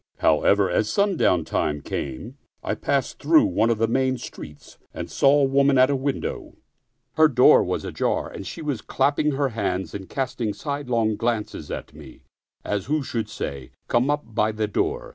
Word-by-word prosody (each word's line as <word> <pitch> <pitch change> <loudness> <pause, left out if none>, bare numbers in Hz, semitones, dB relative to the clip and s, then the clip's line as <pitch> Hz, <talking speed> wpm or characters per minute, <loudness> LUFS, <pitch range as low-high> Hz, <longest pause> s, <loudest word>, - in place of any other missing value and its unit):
However, - - +3
as - - 0
sundown 185 - +2
time 75 -1 -1
came, 90 - -6 0.2
I - - -1
passed 140 -2 -1
through 155 +2 +5
one 110 +6 +1
of 115 - +1
the 115 +1 +1
main 130 +2 +1
streets, 75 -10 -11 0.2
and - - -6
saw 140 +1 +4
a 135 - +3
woman 140 0 +3
at 130 +2 +5
a - - +1
window; 135 +1 -3 0.6
her 155 0 +7
door 125 -4 +6
was - - -3
ajar - - -1
and 95 - -8
she 165 - -7
was 140 -8 -2
clap 145 +6 0
ping 150 -1 +1
her 140 0 0
hands 100 -5 -3
and 95 -2 -7
casting 125 -5 -3
sidelong 125 -7 -1
glances 115 -2 -2
at - - -6
me, - - -14 0.4
as 105 -2 -2
who 150 +1 0
should 115 -4 -3
say, 70 -2 -6
" - - -51
Come 120 +4 +2
up 145 -6 -2
by 110 0 +1
the 110 0 -2
door." 445 - -2
130 Hz, 185 wpm, -23 LUFS, 110-145 Hz, 0.6 s, her